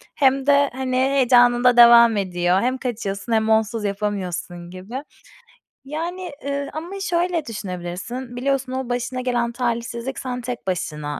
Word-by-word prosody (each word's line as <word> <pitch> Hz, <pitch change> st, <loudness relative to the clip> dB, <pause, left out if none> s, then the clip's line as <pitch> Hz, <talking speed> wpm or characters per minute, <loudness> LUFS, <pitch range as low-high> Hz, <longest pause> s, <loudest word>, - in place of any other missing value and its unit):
hem 270 Hz, -1 st, +2 dB
de, 285 Hz, 0 st, +4 dB
hani, 260 Hz, 0 st, -3 dB
heyecanın 250 Hz, -2 st, +4 dB
da 250 Hz, -1 st, +5 dB
devam 235 Hz, -2 st, +8 dB
ediyor. 180 Hz, -1 st, +1 dB
Hem 255 Hz, +2 st, 0 dB
kaçıyorsun 235 Hz, -4 st, -4 dB
hem 220 Hz, 0 st, +2 dB
onsuz 220 Hz, 0 st, +1 dB
yapamıyorsun 185 Hz, -4 st, -4 dB
gibi. 200 Hz, +9 st, -7 dB, 0.8 s
Yani, 345 Hz, +5 st, -4 dB
ııı, 280 Hz, 0 st, -2 dB
ama 345 Hz, +6 st, -6 dB
şöyle 345 Hz, -3 st, 0 dB
düşünebilirsin. 200 Hz, +5 st, -6 dB
Biliyorsun, 270 Hz, +1 st, -1 dB
o 260 Hz, -1 st, -4 dB
başına 245 Hz, +1 st, -2 dB
gelen 240 Hz, -2 st, 0 dB
talihsizlik 235 Hz, +1 st, -3 dB
sen 250 Hz, -1 st, -4 dB
tek 245 Hz, -4 st, -6 dB
başına 150 Hz, -6 st, -3 dB
245 Hz, 140 wpm, -22 LUFS, 205-265 Hz, 0.8 s, devam